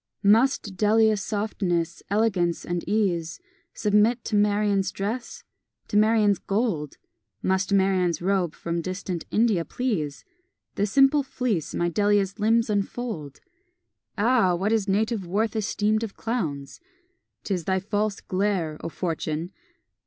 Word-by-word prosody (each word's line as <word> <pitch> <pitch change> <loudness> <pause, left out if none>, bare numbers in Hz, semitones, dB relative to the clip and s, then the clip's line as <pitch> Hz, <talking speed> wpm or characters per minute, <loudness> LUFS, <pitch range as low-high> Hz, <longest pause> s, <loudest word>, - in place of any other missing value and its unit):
Must 215 -1 +3
Delia's 215 +1 +3
softness, 185 -6 -2
elegance, 195 -5 +1
and 175 -1 -2
ease, 180 -6 0 0.4
Submit 210 +3 +2
to 215 - -1
Marian's 205 -2 +2
dress? 235 - -4 0.5
to - - -4
Marian's 210 -1 +4
gold? 195 - -2 0.5
Must 190 +1 0
Marian's 190 -4 +2
robe 180 -3 0
from 170 0 -3
distant 185 -1 -4
India 215 -6 +2
please? 165 - -3 0.5
The 205 - 0
simple 275 +5 +4
fleece 250 - -2
my 175 - +1
Delia's 205 +2 +1
limbs 225 +2 +3
infold! 205 - -3 0.8
Ah! 210 -4 +3
what 195 +5 -1
is 220 -3 +1
native 210 0 0
worth 215 +5 0
esteemed 215 0 0
of 225 -3 -6
clowns? 155 - -3 0.6
'Tis 180 -5 -2
thy 190 0 +1
false 205 +1 -2
glare, 185 -5 -1
O - - -3
Fortune! 165 0 -3
200 Hz, 125 wpm, -25 LUFS, 175-220 Hz, 0.8 s, Marian's